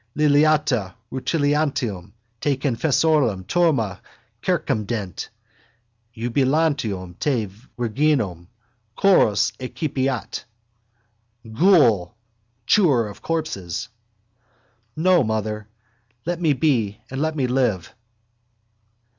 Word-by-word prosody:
Liliata 150 -8 +3 0.2
rutilantium 135 - -1 0.3
te 140 0 0
confessorum 135 - +1
turma 135 - +1 0.4
circumdet: 105 -4 -2 0.9
iubilantium 120 - 0
te 125 -7 0 0.3
virginum 120 - 0 0.5
chorus 115 - +4
excipiat. 130 0 -3 1.1
Ghoul! 120 - +4 0.5
Chewer 135 - +3
of 100 - -12
corpses! 105 - -3 1.1
No, 175 0 +4
mother! 110 -1 -2 0.6
Let 175 +1 -2
me 155 -4 +3
be 120 -8 +1
and 135 +1 -3
let 160 0 0
me 135 -4 0
live. 120 -8 0
130 Hz, 75 wpm, -22 LUFS, 105-155 Hz, 1.1 s, chorus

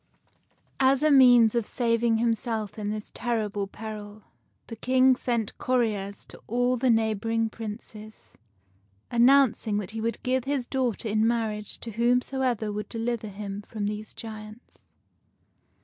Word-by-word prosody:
As 270 +1 +3
a 310 - +4
means 245 -5 +7
of 235 -3 0
saving 230 -2 +2
himself 225 -2 -1
in 205 -1 -3
this 215 0 -5
terrible 210 -4 -2
peril, 210 0 -8 0.4
the 230 - -8
King 255 +3 +3
sent 235 -4 -2
couriers 210 -6 -1
to - - -14
all 245 +2 +1
the 250 +1 +1
neighboring 225 0 +1
Princes, 215 0 -9 0.8
announcing 240 -3 +4
that 205 -2 -4
he 220 0 -5
would 230 +1 -3
give 255 0 0
his 275 -3 -1
daughter 250 -3 -2
in 215 +1 +2
marriage 220 -3 -1
to 230 - -6
whomsoever 245 -1 0
would 210 +1 -5
deliver 230 -1 -3
him 200 0 -6
from 210 0 -5
these 210 +1 -5
giants. 215 +1 -10
225 Hz, 135 wpm, -26 LUFS, 210-245 Hz, 0.8 s, means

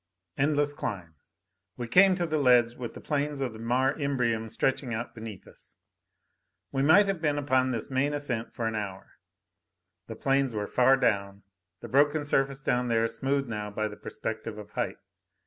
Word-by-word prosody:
Endless 145 +1 +1
climb. 95 - -5 0.6
We 120 - -4
came 185 +9 +6
to 175 -1 -1
the 155 -2 -1
ledge 125 -3 +4
with 120 -1 -7
the - - -9
plains 145 -1 -1
of 130 -4 -2
the 110 - -10
Mare 125 +4 +1
Imbrium 125 -7 -1
stretching 130 +1 -1
out 115 +2 -5
beneath 110 -4 -9
us. - - -12 1.0
We 135 - -1
might 160 +9 +6
have 195 -4 -2
been 145 -3 +1
upon 130 -2 +2
this 120 +1 -3
main 135 +2 +1
ascent 135 -6 -3
for 115 - -4
an 110 - -1
hour; 100 -3 -6 0.9
the 115 - -7
plains 135 0 +1
were 105 -1 -1
far 130 +4 +4
down, 100 -5 0 0.4
the - - -7
broken 145 +2 +3
surface 135 -1 0
down 125 -1 +1
there 115 -1 +2
smoothed 135 +4 -1
now 105 -2 -4
by 110 +1 -2
the 105 - -8
perspective 110 0 -6
of 105 0 -10
height. - - -3
125 Hz, 180 wpm, -28 LUFS, 110-140 Hz, 1.0 s, came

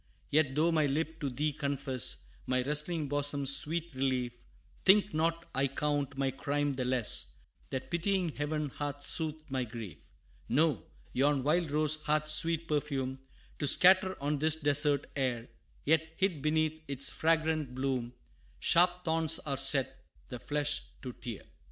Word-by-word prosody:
Yet, 145 -3 +2
though 160 +3 +3
my 155 -3 +2
lip 160 +3 -2
to 145 - -2
thee 145 +4 -1
confess, 135 -3 -2 0.2
My 130 -1 +1
wrestling 150 +3 0
bosom's 140 -1 +1
sweet 170 +2 -2
relief, 130 -2 -1 0.5
Think 205 +2 +5
not 165 +2 0
I 135 +1 +1
count 140 0 -2
my 135 -1 0
crime 145 +2 -1
the 130 -1 -3
less, 125 -3 +1 0.3
That 130 -1 -5
pitying 180 +1 0
Heaven 150 0 -2
hath 145 +1 -5
soothed 155 -2 -4
my 130 -1 0
grief. 115 -5 -8 0.5
No 140 - +1 0.3
yon 140 0 +2
wild 160 +3 +1
rose 155 +1 +1
hath 150 0 +1
sweet 165 +1 +2
perfume 140 -3 -2 0.4
To 145 - 0
scatter 185 +4 +5
on 145 +1 -1
this 155 +1 +4
desert 145 -2 +2
air; 125 -4 -2 0.4
Yet, 160 +1 +1
hid 185 -6 0
beneath 155 +1 0
its 140 0 -2
fragrant 160 -4 0
bloom, 130 -2 -2 0.4
Sharp 175 +1 +3
thorns 160 -1 +2
are 140 -2 -1
set, 135 -1 +2 0.3
the 125 - -6
flesh 145 +1 -1 0.2
to 125 -2 -6
tear. 115 -3 -7
145 Hz, 150 wpm, -31 LUFS, 135-160 Hz, 0.5 s, Think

